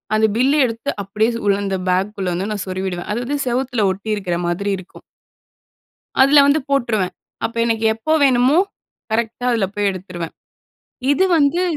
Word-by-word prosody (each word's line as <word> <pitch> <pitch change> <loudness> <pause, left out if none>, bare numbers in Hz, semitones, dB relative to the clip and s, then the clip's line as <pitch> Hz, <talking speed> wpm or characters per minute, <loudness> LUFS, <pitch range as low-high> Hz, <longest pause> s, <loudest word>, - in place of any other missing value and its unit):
அந்த 220 - +4
பில் 270 +4 +3
எடுத்து 230 +4 -4
அப்படியே 210 +3 0
சு 230 - -3
உள்ள 200 -1 +3
அந்த 190 -1 -1
பேக்குள்ள 190 +1 -1
வந்து 190 +4 -2
நான் 205 - -3
சொருவிடுவேன். 185 -1 -4
அது 225 - -2
வந்து, 285 +3 -1
செவத்துல 245 -3 0
ஒட்டியிருக்கிற 195 -3 -2
மாதிரி 190 +4 -1
இருக்கும். 185 0 -13 1.2
அதில 280 +1 +7
வந்து 285 +2 +3
போட்டுருவேன். 230 -9 0 0.3
அப்ப 230 - -3
எனக்கு 225 -1 0
எப்போ 270 +8 -2
வேணுமோ, 260 +4 +4 0.5
கரெக்டா 230 +2 -1
அதில 225 -4 +1
போய் 205 -1 +1
எடுத்துருவேன். 180 -3 -7 0.8
இது 375 +6 +3
வந்து 305 +4 +2
220 Hz, 155 wpm, -19 LUFS, 190-255 Hz, 1.2 s, அதில